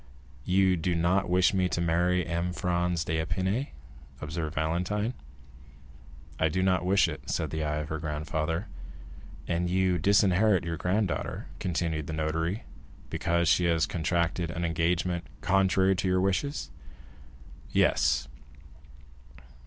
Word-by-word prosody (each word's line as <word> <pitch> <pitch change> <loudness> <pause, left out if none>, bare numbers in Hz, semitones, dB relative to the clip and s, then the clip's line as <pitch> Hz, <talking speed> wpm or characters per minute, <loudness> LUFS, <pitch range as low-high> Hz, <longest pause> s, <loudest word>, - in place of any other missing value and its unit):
"You 95 0 +3
do 85 +2 -1
not 90 +3 +1
wish 90 +2 +3
me 95 -1 +1
to - - -2
marry 85 +2 +1
M. 85 +1 -2
Franz 90 -1 0
d'Épinay?" 95 - -1 0.5
observed 80 +1 -4
Valentine. 90 +8 -1 1.3
"I 80 - +3
do 95 +4 0
not 90 -2 +2
wish 95 +2 +4
it," - - -7
said - - -1
the 80 0 -2
eye 75 0 -1
of 75 0 -4
her 80 - -3
grandfather. 80 +4 -2 0.8
"And 85 +1 0
you 90 -1 +2
disinherit 100 +1 +3
your 85 -1 -3
granddaughter," 95 +2 -1
continued 80 -3 -2
the 80 - -4
notary, 80 +6 -1 0.5
"because 85 0 0
she 85 +2 +4
has 80 -2 +2
contracted 85 +1 -1
an 85 0 -3
engagement 85 +1 0
contrary 95 0 +3
to 95 - -1
your 95 0 +2
wishes?" 100 +10 -1 1.0
"Yes." 65 +1 +2
85 Hz, 130 wpm, -28 LUFS, 80-95 Hz, 1.3 s, wish